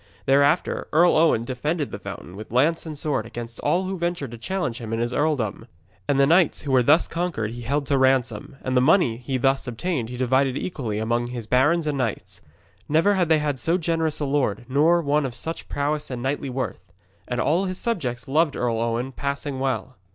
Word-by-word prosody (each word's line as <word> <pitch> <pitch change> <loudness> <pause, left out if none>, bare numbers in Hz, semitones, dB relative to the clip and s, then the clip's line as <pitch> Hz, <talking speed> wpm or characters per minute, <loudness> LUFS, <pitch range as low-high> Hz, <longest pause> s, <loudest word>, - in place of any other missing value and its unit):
Thereafter 140 +5 +2
Earl 170 +3 +5
Owen 155 -8 +4
defended 145 +5 -2
the - - -6
fountain 90 - -8
with 110 +2 -9
lance 155 +8 +2
and 155 -2 -6
sword 140 -7 -1
against 115 0 -8
all 175 +6 +1
who 190 -1 -4
ventured 170 -7 -2
to 120 - -8
challenge 155 -6 -2
him 115 -2 -5
in 115 - -1
his 120 +1 -1
earldom. 125 -7 -1 0.4
And 140 -1 +2
the 140 - +6
knights 170 +2 +3
who 140 - -3
were 130 -1 +5
thus 150 +7 +4
conquered 165 -11 -2
he 120 +1 -7
held 140 +5 -1
to 140 -1 +1
ransom, 130 -3 +1
and 130 0 -1
the 125 - +5
money 135 - +4
he 130 +2 -3
thus 135 +1 +1
obtained 125 0 -2
he 125 - -6
divided 130 +1 +2
equally 120 - -3
among 120 +2 0
his 120 -2 -6
barons 145 +8 +3
and 145 -2 -1
knights. 115 -5 -3 0.5
Never 165 +7 +4
had 180 -4 +1
they 160 - +5
had 145 -3 -1
so 165 +6 +1
generous 165 -2 -1
a 150 - -1
lord, 135 -6 0
nor 160 +6 +3
one 145 +1 +2
of 130 -3 -4
such 165 +1 -5
prowess 150 +1 -2
and 125 -2 -5
knightly 140 +1 -2
worth. 125 -6 -3 0.5
And 125 0 -2
all 165 +9 +2
his 185 -1 -3
subjects 145 - -3
loved 150 +2 +2
Earl 115 -2 0
Owen 115 +3 -1
passing 140 +1 -3
well. 130 -1 -2
135 Hz, 210 wpm, -24 LUFS, 120-160 Hz, 0.5 s, the